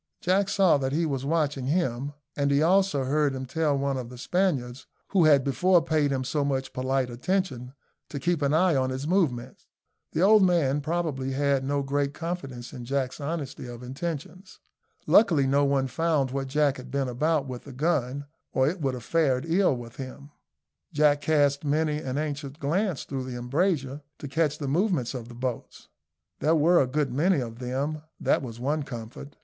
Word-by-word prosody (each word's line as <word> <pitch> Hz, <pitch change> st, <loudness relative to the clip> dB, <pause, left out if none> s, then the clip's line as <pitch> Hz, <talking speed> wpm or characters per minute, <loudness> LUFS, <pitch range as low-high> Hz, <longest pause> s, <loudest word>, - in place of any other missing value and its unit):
Jack 190 Hz, +2 st, +1 dB
saw 190 Hz, -7 st, +4 dB
that 135 Hz, 0 st, -2 dB
he 165 Hz, +3 st, +1 dB
was 135 Hz, -3 st, -2 dB
watching 145 Hz, -4 st, 0 dB
him, 140 Hz, -4 st, -1 dB, 0.2 s
and 140 Hz, -1 st, +1 dB
he 140 Hz, +2 st, +3 dB
also 190 Hz, -4 st, +3 dB
heard 140 Hz, +1 st, +1 dB
him 130 Hz, 0 st, -4 dB
tell 150 Hz, +1 st, 0 dB
one 140 Hz, -1 st, -1 dB
of 125 Hz, -2 st, -5 dB
the 125 Hz, -, -10 dB
Spaniards, 135 Hz, -6 st, -1 dB, 0.2 s
who 185 Hz, -5 st, +4 dB
had 145 Hz, -3 st, +5 dB
before 175 Hz, +7 st, +3 dB
paid 155 Hz, -3 st, +1 dB
him 135 Hz, -2 st, -1 dB
so 145 Hz, +3 st, -1 dB
much 135 Hz, -1 st, -2 dB
polite 130 Hz, 0 st, -1 dB
attention, 130 Hz, -2 st, -2 dB, 0.3 s
to 140 Hz, -, -5 dB
keep 170 Hz, +2 st, 0 dB
an 140 Hz, -1 st, +2 dB
eye 165 Hz, +1 st, +3 dB
on 130 Hz, -1 st, +1 dB
his 130 Hz, +3 st, -4 dB
movements. 135 Hz, -9 st, -1 dB, 0.5 s
The 165 Hz, -, +1 dB
old 215 Hz, +2 st, +7 dB
man, 160 Hz, -7 st, +3 dB
probably, 150 Hz, -4 st, -2 dB
had 140 Hz, -1 st, +1 dB
no 140 Hz, +1 st, 0 dB
great 140 Hz, +1 st, -1 dB
confidence 135 Hz, -8 st, -5 dB
in 125 Hz, -3 st, -7 dB
Jack's 135 Hz, +2 st, -2 dB
honesty 145 Hz, -4 st, -4 dB
of 120 Hz, 0 st, -9 dB
intentions. 165 Hz, +7 st, -6 dB, 0.5 s
Luckily 165 Hz, -10 st, +5 dB
no 140 Hz, +2 st, +3 dB
one 140 Hz, -1 st, +2 dB
found 140 Hz, 0 st, 0 dB
what 135 Hz, 0 st, -2 dB
Jack 145 Hz, 0 st, +1 dB
had 130 Hz, -, -10 dB
been 140 Hz, -1 st, -1 dB
about 150 Hz, +4 st, 0 dB
with 125 Hz, -2 st, -7 dB
the 140 Hz, -, -9 dB
gun, 140 Hz, -1 st, -1 dB, 0.3 s
or 130 Hz, 0 st, +3 dB
it 170 Hz, +3 st, -2 dB
would 135 Hz, -3 st, 0 dB
have 125 Hz, -, -8 dB
fared 140 Hz, -2 st, +1 dB
ill 175 Hz, -3 st, +3 dB
with 120 Hz, -1 st, -10 dB
him. 135 Hz, +2 st, -8 dB, 0.6 s
Jack 145 Hz, -1 st, +3 dB
cast 145 Hz, -1 st, +2 dB
many 150 Hz, +1 st, +1 dB
an 130 Hz, -2 st, -4 dB
anxious 145 Hz, -2 st, -3 dB
glance 165 Hz, +4 st, -1 dB
through 135 Hz, -2 st, -4 dB
the 125 Hz, -1 st, -5 dB
embrasure, 140 Hz, +2 st, -1 dB, 0.2 s
to 145 Hz, -, -7 dB
catch 150 Hz, +1 st, 0 dB
the 145 Hz, -, -4 dB
movements 160 Hz, -, 0 dB
of 120 Hz, -3 st, -6 dB
the 120 Hz, -, -11 dB
boats. 125 Hz, -1 st, -5 dB, 0.5 s
There 160 Hz, +2 st, +3 dB
were 170 Hz, +3 st, +5 dB
a 130 Hz, -, +1 dB
good 135 Hz, -1 st, -1 dB
many 165 Hz, +4 st, +2 dB
of 115 Hz, -2 st, -6 dB
them 135 Hz, +5 st, -2 dB, 0.2 s
that -, -, +2 dB
was 120 Hz, -4 st, -7 dB
one 145 Hz, +5 st, 0 dB
comfort. 125 Hz, +2 st, -8 dB
140 Hz, 190 wpm, -26 LUFS, 130-160 Hz, 0.6 s, old